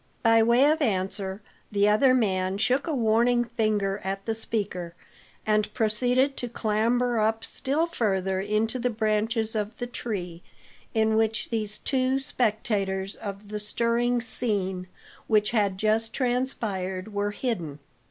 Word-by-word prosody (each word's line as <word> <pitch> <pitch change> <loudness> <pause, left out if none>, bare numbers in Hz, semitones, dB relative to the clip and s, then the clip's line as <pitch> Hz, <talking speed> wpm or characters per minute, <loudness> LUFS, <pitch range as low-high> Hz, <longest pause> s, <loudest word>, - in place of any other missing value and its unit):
By 225 -1 +5
way 235 +4 +5
of 310 +2 +3
answer, 195 -3 -1 0.3
the 205 0 +3
other 255 +5 +5
man 190 -5 +1
shook 255 +8 +1
a 315 - 0
warning 240 +1 +3
finger 215 -4 0
at 195 +1 -4
the 225 - 0
speaker, 195 -6 -3 0.5
and 215 -1 +1
proceeded 245 +5 +2
to 245 - -3
clamber 235 +2 +1
up 220 +1 +1
still 285 +5 0
further 195 - -1
into 215 +4 0
the 250 +1 0
branches 220 0 0
of 210 0 -3
the 245 - -3
tree 185 -8 -5 0.5
in 220 0 +3
which 225 +1 0
these 215 -2 -2
two 260 0 +1
spectators 205 -6 -1
of 200 0 -8
the 210 0 -4
stirring 235 +3 +1
scene 195 -6 -1 0.4
which 210 -2 +3
had 205 -4 +1
just 220 +2 +1
transpired 220 -7 -2
were 205 0 0
hidden. 205 - -3
220 Hz, 140 wpm, -26 LUFS, 200-240 Hz, 0.5 s, By